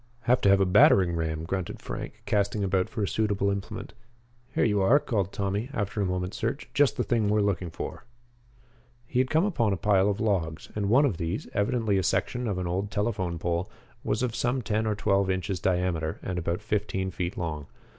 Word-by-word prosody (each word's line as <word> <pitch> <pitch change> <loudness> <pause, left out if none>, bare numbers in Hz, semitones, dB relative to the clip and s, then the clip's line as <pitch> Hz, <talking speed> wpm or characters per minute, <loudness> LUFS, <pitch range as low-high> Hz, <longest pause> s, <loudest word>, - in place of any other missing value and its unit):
"Have 125 +1 +2
to 100 - +4
have 100 0 +6
a 95 - +4
battering 90 -2 +5
ram," 80 -1 -2
grunted 95 +1 -3
Frank, - - -7
casting 105 0 0
about 95 -1 +1
for 110 -2 -3
a - - 0
suitable 100 -2 +1
implement. 100 0 -5 0.6
"Here - - +3
you 105 -3 +2
are," 115 +9 +6
called 100 -9 -1
Tommy, 100 +5 -2
after 105 -3 -2
a 100 - +1
moment's 90 +2 -2
search. 115 +5 -2
"Just 145 -2 +3
the - - +1
thing 115 -4 +1
we 105 - +2
are - - +3
looking 95 -3 -1
for." - - -6 1.0
He 125 - -1
had 130 0 +2
come 160 +4 +3
upon 120 - +1
a - - -1
pile 100 +1 +3
of 100 0 -1
logs, 85 -8 -1
and 100 -2 -1
one 135 +6 +5
of 105 -12 0
these, 85 +1 -3
evidently 105 -2 +1
a - - +2
section 125 +7 0
of 100 -4 -1
an 90 - -2
old 95 +4 -2
telephone 100 -5 -1
pole, 85 +3 -2 0.3
was 110 -2 0
of 120 -2 -1
some 125 +1 0
ten 110 +1 0
or 105 - +1
twelve 100 -2 +1
inches 95 0 -1
diameter 90 -3 0
and 90 -1 -2
about 85 +4 -2
fifteen 100 -3 -1
feet 90 0 -4
long. 75 -4 -4
100 Hz, 210 wpm, -27 LUFS, 90-110 Hz, 1.0 s, have